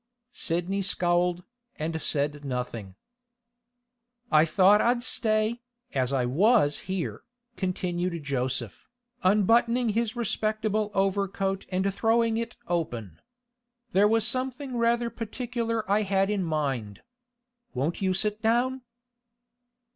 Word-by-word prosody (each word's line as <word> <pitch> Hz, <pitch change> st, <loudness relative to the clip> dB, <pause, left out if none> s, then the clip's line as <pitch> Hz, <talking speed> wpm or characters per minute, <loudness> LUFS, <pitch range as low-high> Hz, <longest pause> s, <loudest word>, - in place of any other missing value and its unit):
Sidney 175 Hz, +4 st, -1 dB
scowled, 175 Hz, -1 st, +1 dB, 0.3 s
and 160 Hz, +1 st, -3 dB
said 145 Hz, 0 st, -1 dB
nothing. 125 Hz, -7 st, -4 dB, 1.4 s
'I 155 Hz, 0 st, +6 dB
thought 190 Hz, +5 st, +5 dB
I'd 240 Hz, 0 st, +2 dB
stay, 220 Hz, -1 st, 0 dB, 0.3 s
as 130 Hz, -1 st, 0 dB
I 130 Hz, -3 st, +1 dB
was 160 Hz, -, +3 dB
here,' 185 Hz, -3 st, -3 dB, 0.3 s
continued 180 Hz, -3 st, -2 dB
Joseph, 130 Hz, -4 st, -3 dB, 0.3 s
unbuttoning 230 Hz, +5 st, +3 dB
his 225 Hz, +2 st, 0 dB
respectable 215 Hz, -2 st, 0 dB
overcoat 195 Hz, 0 st, 0 dB
and 190 Hz, +1 st, 0 dB
throwing 225 Hz, +2 st, +2 dB
it 230 Hz, 0 st, -4 dB
open. 120 Hz, -, -3 dB, 0.7 s
'There 205 Hz, 0 st, +5 dB
was 225 Hz, 0 st, +3 dB
something 255 Hz, +2 st, -2 dB
rather 235 Hz, 0 st, +1 dB
particular 230 Hz, 0 st, -3 dB
I 205 Hz, +2 st, +3 dB
had 195 Hz, 0 st, +1 dB
in 205 Hz, -2 st, 0 dB
mind. 135 Hz, -, -2 dB, 0.7 s
Won't 145 Hz, +9 st, -1 dB
you 190 Hz, -1 st, +1 dB
sit 210 Hz, +2 st, -1 dB
down? 245 Hz, +4 st, +1 dB
195 Hz, 110 wpm, -27 LUFS, 160-225 Hz, 1.4 s, I